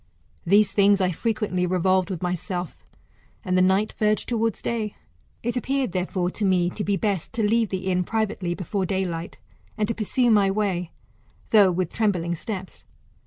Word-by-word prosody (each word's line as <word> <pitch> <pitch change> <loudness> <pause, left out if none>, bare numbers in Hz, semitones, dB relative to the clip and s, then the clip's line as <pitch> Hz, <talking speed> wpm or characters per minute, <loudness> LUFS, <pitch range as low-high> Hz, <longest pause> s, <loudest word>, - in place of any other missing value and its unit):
These 205 +2 +5
things 200 0 +4
I 185 -1 +2
frequently 200 -2 -1
revolved 185 +1 +2
with 185 -2 -4
myself, 180 0 -4 0.6
and 185 -1 0
the 185 - +4
night 190 +3 +2
verged 215 0 +1
towards 230 -2 0
day. 220 -3 -3 0.2
" - - -38
It 240 +2 -1
appeared, 265 -1 -1
therefore, 180 0 -1
to 215 - -5
me 180 -2 +2
to 210 - -4
be 200 0 0
best, 200 -6 -2
to 230 -1 0
leave 225 0 +2
the 190 -1 -4
inn 180 -1 +1
privately 200 -4 -2
before 190 +2 -2
daylight, 175 -3 -3 0.4
and 210 -1 0
to 230 - -1
pursue 235 +3 +1
my 205 -2 +4
way, 195 -4 -1 0.6
though 205 -5 +6
with 180 -1 -2
trembling 180 -6 0
steps. 190 +2 -6
195 Hz, 170 wpm, -24 LUFS, 180-215 Hz, 0.6 s, though